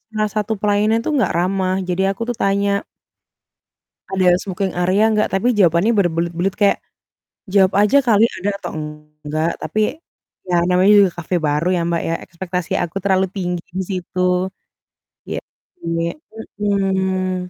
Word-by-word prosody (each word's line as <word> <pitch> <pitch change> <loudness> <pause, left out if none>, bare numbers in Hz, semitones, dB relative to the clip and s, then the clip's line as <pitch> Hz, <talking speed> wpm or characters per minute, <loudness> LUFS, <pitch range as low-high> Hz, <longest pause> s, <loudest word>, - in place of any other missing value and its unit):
salah 215 -1 0
satu 215 +1 0
pelayanannya 210 +2 +2
tuh - - 0
nggak 215 - +1
ramah 185 +1 0
jadi 180 +1 0
aku - - -13
tuh 240 - -7
tanya 200 +1 +1 1.4
ada 190 -1 +1
smoking 190 0 -3
area 185 +4 +2
nggak, 215 0 +2
tapi 195 +5 +1
jawabannya 175 +4 +4
berbelit-belit 175 +1 0
kayak, 205 -1 +4 0.7
jawab 190 -1 +4
aja 210 +7 +5
kali 225 -3 +4
ada 195 +3 -1
atau - - -6 0.5
enggak, 155 +3 -1
tapi 215 - -2 0.7
ya 180 - 0
namanya 185 +3 +4
juga 195 -2 +4
cafe 175 +2 -3
baru 150 +2 0
ya - - 0
Mbak, 170 -1 0
ya 165 - 0
ekspektasi 180 0 -5
aku 170 +2 -9
terlalu 190 -1 +3
tinggi 180 -2 -3
di - - 0
situ, 185 -1 -4 1.1
iya, - - -2 0.5
iya, 165 0 -1 0.5
mhm. 190 -2 0
190 Hz, 145 wpm, -19 LUFS, 175-200 Hz, 1.4 s, aja